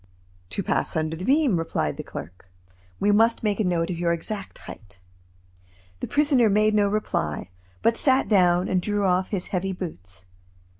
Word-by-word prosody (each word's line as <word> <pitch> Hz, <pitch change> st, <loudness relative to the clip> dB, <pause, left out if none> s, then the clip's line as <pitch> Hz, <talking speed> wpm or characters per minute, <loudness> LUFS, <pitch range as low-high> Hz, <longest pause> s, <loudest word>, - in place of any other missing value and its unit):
"To 200 Hz, -, -3 dB
pass -, -, -1 dB
under 160 Hz, 0 st, -1 dB
the 175 Hz, -, -7 dB
beam," 275 Hz, -, +3 dB
replied 165 Hz, -, -2 dB
the -, -, -5 dB
clerk. 90 Hz, +4 st, -10 dB, 0.5 s
"We 205 Hz, -, +3 dB
must 225 Hz, +3 st, +3 dB
make 210 Hz, -1 st, 0 dB
a -, -, +2 dB
note 175 Hz, -1 st, 0 dB
of 170 Hz, -, -4 dB
your 170 Hz, -1 st, +1 dB
exact 195 Hz, +4 st, -4 dB
height." 100 Hz, -3 st, -12 dB, 1.0 s
The -, -, -4 dB
prisoner 285 Hz, -6 st, +3 dB
made 215 Hz, +1 st, +3 dB
no 205 Hz, -1 st, +3 dB
reply, 90 Hz, -, -2 dB, 0.3 s
but 230 Hz, 0 st, +3 dB
sat 265 Hz, -1 st, +2 dB
down 180 Hz, -3 st, +3 dB
and 185 Hz, -1 st, +1 dB
drew 205 Hz, +1 st, -1 dB
off 185 Hz, 0 st, +1 dB
his 195 Hz, -4 st, -3 dB
heavy 190 Hz, +1 st, -2 dB
boots. 95 Hz, -, -8 dB
190 Hz, 170 wpm, -24 LUFS, 165-215 Hz, 1.0 s, beam